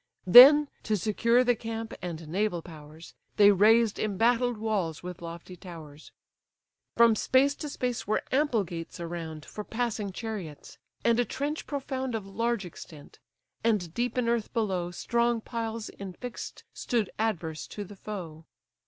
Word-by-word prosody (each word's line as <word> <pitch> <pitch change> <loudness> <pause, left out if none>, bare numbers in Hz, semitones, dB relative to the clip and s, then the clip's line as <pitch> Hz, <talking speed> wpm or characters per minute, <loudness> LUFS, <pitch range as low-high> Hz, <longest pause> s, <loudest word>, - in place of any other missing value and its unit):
Then, 275 +10 +10
to 215 -1 0
secure 230 +5 +2
the 245 -1 +3
camp 225 0 -5
and 165 -3 -6
naval 180 0 -1
powers, 155 0 -12 0.2
They 205 -1 +8
raised 215 +2 +4
embattled 230 +3 +1
walls 200 -8 -2
with 180 -1 -7
lofty 170 +2 -8
towers: 160 -4 -11 0.9
From 230 -1 +6
space 265 +6 +3
to 300 - -5
space 250 -6 -3
were 215 - 0
ample 265 -6 +2
gates 170 -2 -7
around, 165 -2 -6
For 210 - -7
passing 225 -3 -3
chariots, 190 -7 -7 0.3
and 235 0 +4
a - - +4
trench 290 +5 -4
profound 265 -3 -3
Of 215 -3 -4
large 230 +1 -1
extent; 155 -3 -12 0.4
and 205 -8 0
deep 240 +3 -2
in 245 -2 +1
earth 235 -2 0
below, 190 -7 -1
Strong 235 +5 0
piles 225 -1 -5
infix'd 200 +5 -7
stood 230 -6 -1
adverse 170 -8 -2
to 205 - -6
the 205 +1 -11
foe. 175 -6 -8
215 Hz, 145 wpm, -28 LUFS, 175-235 Hz, 0.9 s, Then